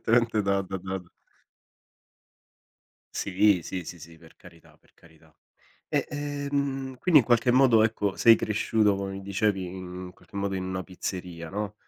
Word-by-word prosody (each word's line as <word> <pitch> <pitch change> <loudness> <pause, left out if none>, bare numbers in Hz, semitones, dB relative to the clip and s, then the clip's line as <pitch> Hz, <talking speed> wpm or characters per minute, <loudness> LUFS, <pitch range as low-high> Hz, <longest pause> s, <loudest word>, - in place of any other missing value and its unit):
indipendentemente 115 -1 +2
da 100 0 +1
da 95 0 -5
da 95 +1 -4 2.2
Sì. 100 -1 +3
Sì, 90 -3 -5
sì, 90 - -8
sì. 80 +1 -13
Per 80 -1 -18
carità, 85 - -18
per - - -31
carità. 80 -1 -22 0.6
E, - - 0
ehm, 140 -2 -3
quindi, 165 +2 +5
in 115 - -6
qualche 120 0 +3
modo, 125 -3 +5
ecco, 105 -3 0
sei 115 -1 +7
cresciuto, 110 -1 +1
come 95 0 -4
mi 95 - -6
dicevi, 100 -1 0
in 90 0 -7
qualche - - -15
modo, 100 -1 -1
in 95 - -2
una 95 0 -4
pizzeria, 90 -3 -6
no, 105 +1 -4
100 Hz, 155 wpm, -27 LUFS, 90-115 Hz, 2.2 s, sei